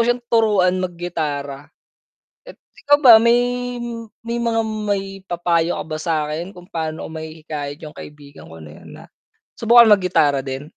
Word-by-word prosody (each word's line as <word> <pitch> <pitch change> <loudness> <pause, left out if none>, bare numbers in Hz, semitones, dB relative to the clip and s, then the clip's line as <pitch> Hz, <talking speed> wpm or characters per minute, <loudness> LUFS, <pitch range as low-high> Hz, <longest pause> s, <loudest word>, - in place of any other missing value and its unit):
siyang 245 0 0
turuan 195 -5 +3
maggitara. 150 -6 -4 0.7
Pe - - -14
ikaw 290 0 0
ba 240 -3 +10
may 235 +1 +4 0.9
may 235 +1 -3
mga 230 -1 0
maipapayo 195 -5 -2
ka - - -4
ba 155 -1 -5
sakin? 160 +3 -3
Kung 180 0 -13
pa'no 160 -1 -4
ko - - -9
mahihikayat 155 -2 -7
yung 150 - -10
kaibigan 145 - -13
ko 80 - -12
na 75 - -12
'yon - - -14
na, - - -13 0.5
subukan 235 -1 +6
maggitara 165 -8 +2
din? 135 +1 -6
175 Hz, 145 wpm, -20 LUFS, 150-210 Hz, 0.9 s, ba